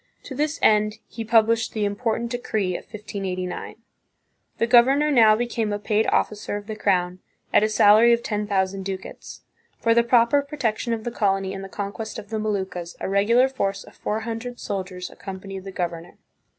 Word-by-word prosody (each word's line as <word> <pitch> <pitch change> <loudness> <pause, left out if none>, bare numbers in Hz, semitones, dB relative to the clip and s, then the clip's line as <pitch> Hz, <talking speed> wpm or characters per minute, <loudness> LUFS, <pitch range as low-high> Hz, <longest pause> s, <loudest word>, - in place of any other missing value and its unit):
To - - -8
this 300 +4 -1
end 215 0 +3
he 230 - -6
published 225 0 +3
the 215 -2 0
im 200 0 -1
portant 230 +1 -2
decree 215 -6 -1
of - - -6
1589. 195 -4 -5 0.8
The - - +2
governor 265 +5 +5
now 225 -5 +6
became 230 -2 -1
a 205 - -1
paid 210 +1 0
officer 210 -1 0
of 205 - -9
the 215 0 -5
crown, 180 -3 0 0.3
at - - +6
a 215 - +2
salary 215 +2 +6
of 235 0 +2
ten 210 -1 -2
thousand 195 -1 0
ducats. 190 0 -7 0.4
For 230 - +3
the 235 - +5
proper 235 +3 +4
protection 255 -5 -2
of 220 -1 -4
the 240 - -3
colony 195 -4 0
and 195 0 -6
the 195 - -8
conquest 205 +2 -5
of 205 - -9
the 220 - -1
Moluccas, 190 -5 -3
a - - -3
regular 215 +6 +4
force 200 -7 -2
of - - -16
four 215 +1 -3
hundred 230 +2 -5
soldiers 185 -2 -5
ac - - -17
companied 195 0 -7
the 195 - -6
governor. 170 -2 -5
215 Hz, 190 wpm, -24 LUFS, 195-235 Hz, 0.8 s, now